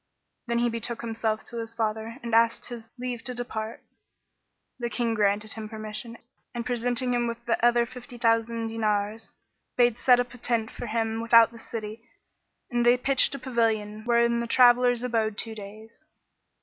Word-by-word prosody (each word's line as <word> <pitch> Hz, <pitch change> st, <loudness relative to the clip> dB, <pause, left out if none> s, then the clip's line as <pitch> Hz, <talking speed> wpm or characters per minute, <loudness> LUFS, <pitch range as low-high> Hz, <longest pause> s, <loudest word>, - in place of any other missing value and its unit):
Then 235 Hz, 0 st, 0 dB
he 240 Hz, 0 st, +2 dB
betook 230 Hz, 0 st, -4 dB
himself 225 Hz, -1 st, -2 dB
to 235 Hz, -, -9 dB
his 230 Hz, 0 st, -5 dB
father 220 Hz, +1 st, -2 dB
and 235 Hz, -1 st, -5 dB
asked 230 Hz, 0 st, +3 dB
his 230 Hz, -2 st, -9 dB
leave 245 Hz, -2 st, -4 dB
to 250 Hz, -, -3 dB
depart. 225 Hz, -2 st, -5 dB, 1.0 s
The 240 Hz, -1 st, -2 dB
King 235 Hz, -1 st, -1 dB
granted 210 Hz, 0 st, +1 dB
him 220 Hz, -1 st, -7 dB
permission 215 Hz, +1 st, -6 dB, 0.4 s
and, 235 Hz, 0 st, -3 dB
presenting 245 Hz, 0 st, 0 dB
him 240 Hz, -1 st, +1 dB
with 235 Hz, 0 st, -6 dB
other 240 Hz, 0 st, +4 dB
fifty 245 Hz, +1 st, -10 dB
thousand 230 Hz, 0 st, +1 dB
dinars, 215 Hz, 0 st, -1 dB, 0.5 s
bade 240 Hz, -2 st, +3 dB
set 250 Hz, -1 st, +5 dB
up 245 Hz, 0 st, -2 dB
a 245 Hz, -, -12 dB
tent 225 Hz, -2 st, -1 dB
for 245 Hz, -, -7 dB
him 225 Hz, 0 st, -1 dB
without 230 Hz, 0 st, +6 dB
the 230 Hz, -, -12 dB
city 220 Hz, -1 st, -6 dB, 0.7 s
and 240 Hz, 0 st, +1 dB
they 240 Hz, +1 st, +5 dB
pitched 270 Hz, +2 st, +3 dB
a -, -, -4 dB
pavilion 220 Hz, -4 st, -1 dB
wherein 235 Hz, 0 st, +3 dB
the 235 Hz, -, -2 dB
travellers 245 Hz, 0 st, +5 dB
abode 220 Hz, -4 st, 0 dB
two 225 Hz, -, -3 dB
days. 220 Hz, +7 st, -12 dB
230 Hz, 170 wpm, -26 LUFS, 220-240 Hz, 1.0 s, without